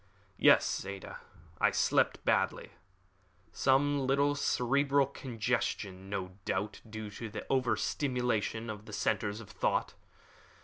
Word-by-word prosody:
"Yes, - - +5
Ada; 100 0 -7 0.4
I - - +5
slept - - +1
badly. - - +1 0.8
Some 140 0 +2
little 140 +2 +3
cerebral 140 +1 +2
congestion, 115 -7 -3
no 95 -1 -4
doubt 100 +3 -2
due 110 -1 -6
to 110 +1 -6
over 130 -4 +2
stimulation 115 -2 -1
of 105 0 -9
the 105 - -9
centers 105 0 0
of 105 - -12
thought. - - 0
115 Hz, 115 wpm, -32 LUFS, 105-135 Hz, 0.8 s, Yes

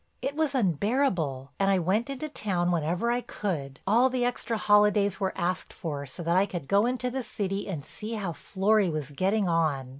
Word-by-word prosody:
It 280 - -3
was 310 -3 +1
unbearable, 180 - 0
and 195 0 +3
I 195 - +4
went 195 +8 +1
into 275 +2 -4
town 185 -11 -1
whenever 175 +7 0
I 245 +1 0
could; 145 - -4
all 235 +6 +4
the 250 -1 0
extra 240 -2 -1
holidays 205 -2 +3
were 190 -2 0
asked 180 +1 -2
for 145 -4 -5
so 150 +6 -8
that 170 +1 +1
I 195 +2 +4
could 175 -8 -6
go 200 +3 +3
into 250 0 -1
the 265 +1 -2
city 200 -4 -3
and 155 -7 -4
see 220 +2 -7
how 195 -6 -3
Florry 200 +3 +1
was 150 -3 -4
getting 195 +7 +1
on. 155 -6 +1
195 Hz, 200 wpm, -28 LUFS, 170-230 Hz, -, I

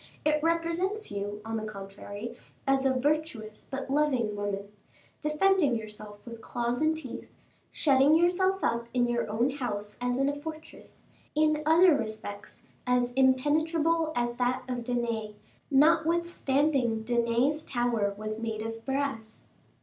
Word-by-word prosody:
It 305 0 +3
represents 335 +6 0
you, 205 +1 -4
on 225 0 -2
the 215 - -4
contrary, 205 +2 -7 0.3
as 270 0 +3
a 260 -1 +1
virtuous 280 -7 -2
but 270 0 -4
loving 265 -7 +1
woman, 200 -1 -3 0.5
defending 305 -2 +3
yourself 210 -2 -8
with 230 -1 -9
claws 240 +2 -2
and 315 0 +2
teeth, 270 -6 -7 0.4
shutting 280 +1 +4
yourself 370 +3 +2
up 235 0 0
in 245 -1 +3
your 240 -2 -1
own 235 +5 +1
house 210 -7 -4
as 245 0 0
in 275 +1 +2
a 285 - +1
fortress; 315 +2 -10 0.3
in 305 0 +3
other 335 +1 +6
respects, 215 -3 -6 0.2
as 245 0 +2
impenetrable 310 +5 +2
as 240 0 0
that 250 0 0
of 250 -2 -3
Danae, 230 -3 -2 0.3
notwithstanding 300 -5 +2
Danae's 240 +5 +1
tower 240 -4 0
was 215 +1 -4
made 220 -1 -3
of 225 0 -6
brass." 270 -5 -3
250 Hz, 135 wpm, -29 LUFS, 225-305 Hz, 0.5 s, other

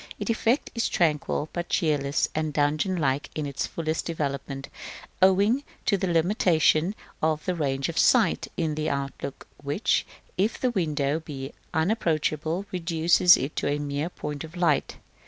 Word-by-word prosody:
Its - - -1
effect 230 +4 +1
is 230 -1 0
tranquil, 150 -2 0
but 175 0 -4
cheerless 145 -3 +1
and 155 -1 -2
dungeon 150 +6 +1
like 140 -3 0
in 155 - -2
its 140 -1 -3
fullest 160 -1 -2
development, 140 -4 -4 0.5
owing 200 +8 +4 0.2
to 205 - +3
the 190 -1 -1
limitation 170 0 +3 0.3
of 155 -1 0
the 185 - 0
range 135 -5 -1
of 165 - -2
sight 225 -8 +4
in 160 -2 0
the 155 +1 -1
outlook, 140 0 -4 0.2
which, 145 +9 +1 0.4
if 210 +4 +1
the 255 - +1
window 155 -7 0
be 140 -3 -7 0.2
unapproachable, 160 -1 0
reduces 175 0 +4
it 135 +4 -4
to - - -1
a 145 +1 +1
mere 145 +2 -2
point 150 -4 -6
of 160 +2 -10
light. 165 -5 +1
155 Hz, 155 wpm, -26 LUFS, 145-180 Hz, 0.5 s, owing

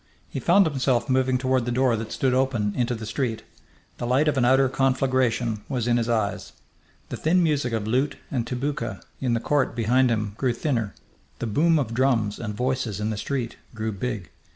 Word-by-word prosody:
He - - -4
found 200 -1 +5
himself 130 -4 +1
moving 130 0 +2
toward 130 -1 +1
the 120 - -1
door 125 -1 +2
that 110 0 -5
stood 130 -2 +1
open 125 -6 +1
into 120 -1 0
the 110 -1 -6
street. 115 +1 -2 0.6
The 120 - -2
light 135 +5 +3
of 150 - +2
an 130 -2 +2
outer 135 +2 +5
conflagration 130 -4 +1
was 125 -4 -1
in 120 0 +3
his 115 0 -1
eyes. 110 -4 -1 0.6
The - - -4
thin 175 +3 +3
music 145 -6 +1
of 110 -2 -1
lute 130 +6 0
and 120 -4 -1
tabouka 125 -2 -3 0.2
in 125 -3 0
the - - +1
court 140 -1 0
behind 125 +3 +3
him 105 -3 -1
grew 130 -3 +1
thinner; 115 -5 -2 0.4
the - - -3
boom 155 +9 +3
of 125 -6 -1
drums 115 -5 +1
and 105 -2 -4
voices 125 -4 -1
in 105 +1 -1
the - - -2
street 120 +1 -3 0.2
grew 110 0 -2
big. 105 -2 -4
125 Hz, 200 wpm, -25 LUFS, 115-135 Hz, 0.6 s, found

